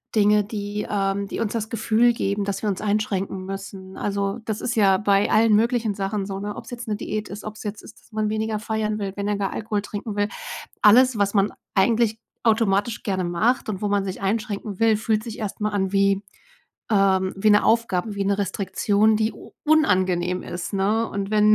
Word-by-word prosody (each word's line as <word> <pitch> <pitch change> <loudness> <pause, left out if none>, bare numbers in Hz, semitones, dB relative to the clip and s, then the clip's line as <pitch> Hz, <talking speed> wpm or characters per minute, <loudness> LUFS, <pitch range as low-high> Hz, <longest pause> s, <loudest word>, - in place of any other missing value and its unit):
Dinge, 210 0 +4
die 205 0 -4
ähm, 200 0 0
die - - -5
uns 220 -2 -1
das 220 -2 -2
Gefühl 230 +1 +3
geben, 200 -2 -1
dass 200 -1 -3
wir 210 - +1
uns 190 - -2
einschränken 200 -3 -1
müssen. 195 -1 -7
Also, 200 +1 -2
das 215 -1 -2
ist 240 - -2
ja 195 -4 +5
bei 200 0 +2
allen 220 0 +5
möglichen 230 0 +2
Sachen 195 0 -2
so, 195 0 -5
ne, 205 0 -4
ob's - - -9
jetzt 240 -1 -7
'ne 210 - 0
Diät 215 0 -4
ist, 205 +1 -8
ob's 215 0 -7
jetzt 210 -1 -5
ist, - - -14
dass - - -26
man 215 0 -1
weniger 215 0 -1
feiern 215 -1 -2
will, 195 -2 -3
weniger 205 0 -1
gar 195 -1 -2
Alkohol 210 -1 -2
trinken 205 +1 -6
will. 205 0 +2 0.5
Alles, 245 +3 +6
was 200 -1 +1
man 200 0 +2 0.2
eigentlich 225 +2 +2 0.2
automatisch 220 -1 +1
gerne 190 -3 -1
macht 215 +9 +1
und 195 -3 -4
wo 210 - 0
man 200 -1 +1
sich 190 -1 -5
einschränken 205 -1 -2
will, 225 -1 +4
fühlt 215 0 0
sich 230 -1 -7
erst 210 0 -5
mal 210 - +1
an 190 -2 0
wie 195 0 +3 0.7
ähm, 190 -2 +3
wie 210 +2 +3
'ne 205 0 +5
Aufgabe, 225 -3 +1
wie 200 - -1
'ne 200 +1 +1
Restriktion, 205 +2 +1
die 220 +1 0
u - - -14
unangenehm 185 - +2
ist, 175 +3 -5
ne? 210 +4 +1
Und 200 0 -4
wenn 215 0 +5
205 Hz, 205 wpm, -23 LUFS, 195-220 Hz, 0.7 s, Alles